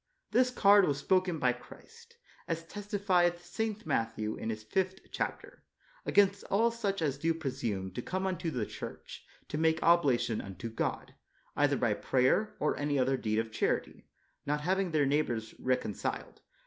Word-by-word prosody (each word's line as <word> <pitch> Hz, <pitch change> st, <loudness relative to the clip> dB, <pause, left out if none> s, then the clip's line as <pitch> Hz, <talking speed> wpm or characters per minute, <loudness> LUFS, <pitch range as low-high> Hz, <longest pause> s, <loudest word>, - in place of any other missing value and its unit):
This 255 Hz, 0 st, +4 dB
card 205 Hz, -5 st, +6 dB
was 145 Hz, -2 st, +1 dB
spoken 185 Hz, +3 st, +1 dB
by 125 Hz, -4 st, +2 dB
Christ, 465 Hz, -, -15 dB, 0.3 s
as 165 Hz, 0 st, -3 dB
testifieth 185 Hz, -3 st, 0 dB
St. 215 Hz, +4 st, -3 dB
Matthew 110 Hz, -1 st, -1 dB
in -, -, -4 dB
his 110 Hz, -1 st, -4 dB
fifth 185 Hz, -, -1 dB
chapter, -, -, -4 dB, 0.4 s
against 200 Hz, 0 st, +4 dB
all 230 Hz, +4 st, +2 dB
such 200 Hz, -6 st, -2 dB
as 140 Hz, -3 st, -1 dB
do 165 Hz, +2 st, +1 dB
presume 120 Hz, -11 st, -3 dB
to 120 Hz, -, -4 dB
come 185 Hz, +8 st, -3 dB
unto 180 Hz, -3 st, -1 dB
the 125 Hz, -8 st, -2 dB
Church -, -, -8 dB, 0.2 s
to 150 Hz, -, -3 dB
make 160 Hz, 0 st, +2 dB
oblation 140 Hz, -9 st, +3 dB
unto 95 Hz, +3 st, -7 dB
God, 115 Hz, -, -3 dB, 0.4 s
either -, -, +3 dB
by -, -, +2 dB
prayer, 210 Hz, +12 st, +1 dB
or 150 Hz, -, +1 dB
any 145 Hz, 0 st, 0 dB
other 135 Hz, +1 st, +2 dB
deed 110 Hz, -4 st, -1 dB
of 110 Hz, 0 st, -1 dB
charity, 110 Hz, -, -1 dB, 0.4 s
not 150 Hz, +1 st, -1 dB
having 190 Hz, +3 st, +1 dB
their 155 Hz, -3 st, +2 dB
neighbors 120 Hz, -6 st, 0 dB
recon 125 Hz, -4 st, 0 dB
ciled. -, -, -5 dB
160 Hz, 160 wpm, -31 LUFS, 125-195 Hz, 0.4 s, card